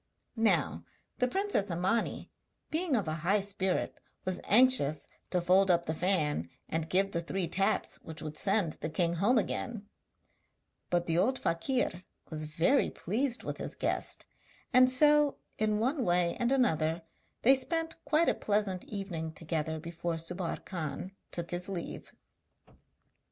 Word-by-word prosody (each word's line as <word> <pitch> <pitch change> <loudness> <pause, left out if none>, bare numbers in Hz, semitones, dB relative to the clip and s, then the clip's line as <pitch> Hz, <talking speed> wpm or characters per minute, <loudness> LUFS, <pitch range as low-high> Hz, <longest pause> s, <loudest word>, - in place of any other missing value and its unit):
Now 225 -1 +1 0.4
the 250 - +3
princess 385 - 0
Imani, 180 +7 -1 0.4
being 320 -2 0
of 205 -7 0
a 155 0 -2
high 195 +6 +3
spirit, 190 -2 -1 0.3
was 185 -1 -2
anxious 215 - +4 0.2
to 180 - +1
fold 185 +2 +4
up 170 -1 +3
the 160 - -1
fan, 155 - +1 0.2
and 160 0 -3
give 195 +2 +2
the 170 - -1
three 175 +1 -2
taps 195 +5 0
which 160 0 -9
would 155 -1 -6
send 195 -3 +3
the 155 - -3
king 170 +1 0
home 220 +8 +3
again; 220 -1 -2 1.0
but 175 -1 +1
the 165 0 +1
old 260 +7 +2
fakir 180 +1 -1 0.3
was 155 -1 -3
very 165 - +2
pleased 240 +6 -1
with - - -4
his - - -5
guest, - - -2 0.5
and 255 +1 +7
so 295 +2 +5 0.2
in 215 -1 +1
one 260 +5 0
way 175 -3 +2
and 240 +1 +1
another 165 - +1 0.4
they 265 - +7
spent 325 +4 +1
quite 310 +3 +2
a - - +4
pleasant 205 -3 -1
evening 180 -6 -4
together 160 0 -3
before 170 +1 -4
Subbar 170 +2 -4
Khan 175 +1 -5 0.2
took 170 -1 -6
his 175 +2 -3
leave. 180 -4 -6
185 Hz, 150 wpm, -31 LUFS, 165-240 Hz, 1.0 s, and